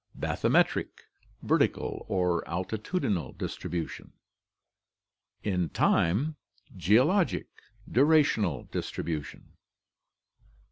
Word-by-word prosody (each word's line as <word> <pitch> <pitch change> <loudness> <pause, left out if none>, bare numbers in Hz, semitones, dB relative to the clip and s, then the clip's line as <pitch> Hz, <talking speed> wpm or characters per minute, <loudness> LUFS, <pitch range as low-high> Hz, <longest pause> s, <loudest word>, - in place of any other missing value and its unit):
Bathymetric. - - +1 0.4
Vertical - - 0
or 90 -2 +1
altitudinal 95 - -2
distribution. 85 -1 -5 1.3
In 90 -5 0
time: 130 - +2 0.4
Geologic. 125 - +3 0.4
Durational 130 - +3
distribution. 75 -3 -4
95 Hz, 55 wpm, -29 LUFS, 85-140 Hz, 1.3 s, Geologic